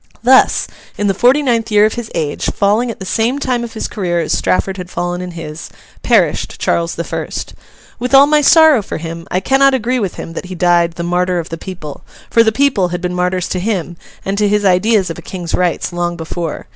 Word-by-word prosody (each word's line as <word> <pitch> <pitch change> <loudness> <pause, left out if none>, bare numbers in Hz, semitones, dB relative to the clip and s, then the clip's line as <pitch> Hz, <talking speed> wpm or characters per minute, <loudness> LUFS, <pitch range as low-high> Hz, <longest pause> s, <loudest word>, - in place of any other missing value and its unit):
Thus, 260 +2 +4 0.3
in 205 - -1
the 195 - +2
forty 250 +8 +3
ninth 235 -4 0
year 210 -1 +5
of 215 - 0
his 240 -2 -6
age, 155 -3 -2
falling 215 +4 +1
at 230 - -6
the 190 - -7
same 230 +7 0
time 250 -4 -1
of 235 - -7
his 220 - -3
career 175 -4 -2
as 165 - -1
Strafford 190 +1 0
had 180 -1 -7
fallen 175 0 -3
in 180 - -5
his, 155 -1 -7 0.3
perished - - +1
Charles 170 0 -1
the 170 - -3
First. - - -5 0.5
With 250 +3 +1
all 275 +1 +8
my 300 +1 +3
sorrow 315 -4 +6
for - - -6
him, 165 +1 -7
I 180 - 0
cannot 270 +6 +3
agree 250 +1 -1
with 195 -5 -3
him 165 - -7
that 170 - -6
he 185 0 -7
died 175 -1 +2
'the 170 - -5
martyr 180 +1 0
of 170 -1 -4
the 165 - -4
people;' 160 -6 -8 0.3
for 230 - +5
the 220 -1 +3
people 245 -6 +2
had 175 0 -4
been 180 0 -2
martyrs 180 0 -1
to 185 - -2
him, 180 -4 -2 0.3
and 195 +1 -1
to 210 - +3
his 210 0 +1
ideas 190 0 +2
of - - -7
a - - -9
King's 175 -3 -6
rights, 180 0 0
long 175 0 -2
before. 165 -1 -5
185 Hz, 230 wpm, -16 LUFS, 175-230 Hz, 0.5 s, all